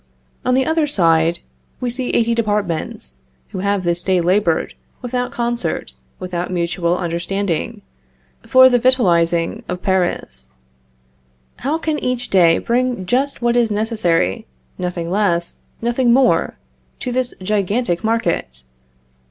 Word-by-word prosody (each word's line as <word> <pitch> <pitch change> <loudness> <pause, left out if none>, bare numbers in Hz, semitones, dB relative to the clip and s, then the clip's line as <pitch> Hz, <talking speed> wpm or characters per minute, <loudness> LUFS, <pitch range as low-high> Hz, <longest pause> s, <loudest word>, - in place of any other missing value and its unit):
On 250 0 +2
the 265 0 +2
other 320 -1 +1
side, 165 - +2 0.4
we 250 -1 -2
see 250 +1 -3
eighty 235 0 +2
departments 195 - -1 0.3
who - - -6
have 200 0 0
this 175 0 0
day 185 0 +1
labored, 180 -1 +1 0.3
without 250 0 -2
concert, 240 0 -2 0.2
without 180 -1 -4
mutual 175 0 0
understanding, 175 0 -2 0.6
for 260 0 +7
the 245 -1 +3
victualing 175 -6 +2
of 180 0 -4
Paris. 65 - -1 1.0
How 290 +5 -1
can 315 -2 -2
each 250 -1 -3
day 170 -3 +5
bring 245 -4 -1
just 260 +6 0
what 240 0 +2
is 240 -2 +3
necessary, 205 - 0 0.3
nothing 175 -1 -3
less, 175 -4 0 0.2
nothing 240 +1 +2
more, 255 +1 +3 0.4
to 250 - -4
this 255 0 -1
gigantic 200 0 -1
market? 170 - -1
200 Hz, 125 wpm, -19 LUFS, 170-245 Hz, 1.0 s, for